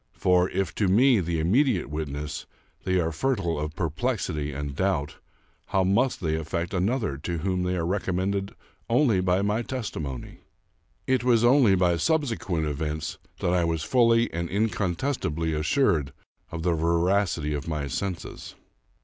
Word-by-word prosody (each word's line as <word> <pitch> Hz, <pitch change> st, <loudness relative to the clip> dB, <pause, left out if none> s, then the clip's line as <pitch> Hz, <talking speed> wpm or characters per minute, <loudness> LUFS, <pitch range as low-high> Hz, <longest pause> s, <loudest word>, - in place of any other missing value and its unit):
For, 90 Hz, 0 st, +2 dB
if 95 Hz, -4 st, -2 dB
to 100 Hz, -, +4 dB
me, 120 Hz, +5 st, +5 dB
the 85 Hz, -2 st, -1 dB
immediate 105 Hz, -, +2 dB
witness, 75 Hz, +1 st, -5 dB, 0.4 s
they 95 Hz, -, +1 dB
were 80 Hz, -2 st, +1 dB
fertile 85 Hz, -, -1 dB
of 75 Hz, +1 st, -4 dB
perplexity 80 Hz, -, -2 dB
and 70 Hz, 0 st, -5 dB
doubt, 90 Hz, -5 st, -1 dB, 0.5 s
how 95 Hz, -1 st, +2 dB
must 110 Hz, +7 st, +1 dB
they 80 Hz, -3 st, 0 dB
affect 80 Hz, +2 st, -3 dB
another 100 Hz, -, 0 dB
to 85 Hz, +4 st, -4 dB
whom 90 Hz, +2 st, -1 dB
they 90 Hz, 0 st, 0 dB
are 85 Hz, -2 st, -1 dB
recommended 95 Hz, +1 st, -1 dB, 0.3 s
only 115 Hz, -5 st, +3 dB
by 90 Hz, +1 st, +2 dB
my 105 Hz, +3 st, +1 dB
testimony? 85 Hz, -, -5 dB, 0.7 s
It 130 Hz, -3 st, +1 dB
was 120 Hz, -2 st, +3 dB
only 120 Hz, -5 st, +5 dB
by 90 Hz, -2 st, +2 dB
sub 160 Hz, -, +2 dB
sequent 90 Hz, -, -2 dB
events 75 Hz, +1 st, -3 dB, 0.2 s
that 90 Hz, -, +1 dB
I 90 Hz, -1 st, +2 dB
was 80 Hz, -2 st, -1 dB
fully 115 Hz, 0 st, +3 dB
and 85 Hz, 0 st, -3 dB
incontestably 95 Hz, -, -1 dB
assured 75 Hz, -, +1 dB, 0.4 s
of 85 Hz, -1 st, -5 dB
the 90 Hz, -1 st, +2 dB
veracity 85 Hz, -1 st, +1 dB
of 75 Hz, 0 st, -4 dB
my 75 Hz, -3 st, -2 dB
senses. 90 Hz, +5 st, -5 dB
90 Hz, 150 wpm, -26 LUFS, 80-105 Hz, 0.7 s, me